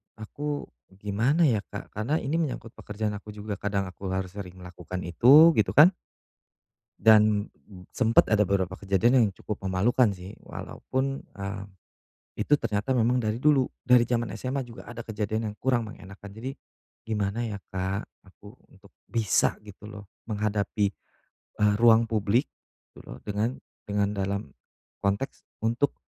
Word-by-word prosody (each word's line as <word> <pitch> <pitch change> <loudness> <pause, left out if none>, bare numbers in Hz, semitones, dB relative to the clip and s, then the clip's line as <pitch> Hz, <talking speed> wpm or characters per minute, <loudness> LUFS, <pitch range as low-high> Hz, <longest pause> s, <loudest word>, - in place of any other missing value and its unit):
aku 145 +7 -4 0.3
gimana, 110 - +1
ya, 120 -9 +4
Kak, 100 - -8
karena 110 +9 -1
ini 155 +5 0
menyangkut 130 -7 -3
pekerjaan 105 0 -4
aku 105 0 -8
juga, 105 -1 -5
kadang 100 -1 -1
aku 95 +1 -7
harus 95 0 -2
sering 95 -2 -8
melakukan 90 0 -7
itu, 135 - +7
gitu, 100 -1 +1
kan? 160 +7 +8 1.1
Dan, 105 -1 +5
hmm, 90 -3 -16
sempet 115 -2 +3
ada 105 -1 +4
beberapa 95 -1 -1
kejadian 100 +5 +2
yang 115 -4 +5
cukup 105 0 -6
memalukan, 110 +7 +3
sih, 95 +1 -10
walaupun, 135 +1 -4
eee, 100 0 -5 0.7
itu 110 +8 0
ternyata 110 +2 -1
memang 120 +2 +2
dari 110 0 -1
dulu, 140 -2 +3 0.2
dari 125 -1 +6
jaman 120 -1 -1
SMA 130 +4 -3
juga 120 -1 -11
ada 120 -1 -7
kejadian 110 0 -2
yang - - -21
kurang 120 -3 +1
mengenakkan. 100 -1 -11
Jadi, 120 +5 -5 0.6
gimana, 105 +1 -1
ya, 105 -2 -4
Kak, 95 +2 -2 0.2
aku 100 +4 -16 0.2
untuk 100 0 -19 0.2
bisa, 115 -4 +2
gitu, 105 0 -12
loh, 105 -1 -10 0.2
menghadapi, 105 -1 0 0.8
eee, 105 0 +5
ruang 115 -1 +5
publik, 110 +4 +1 0.4
gitu, - - -16
loh, - - -9
dengan 105 +4 -1 0.3
dengan 100 -1 0
dalam 100 +1 -1 0.6
konteks 100 +7 -2 0.2
untuk 120 +5 +1
105 Hz, 145 wpm, -27 LUFS, 100-120 Hz, 1.1 s, kan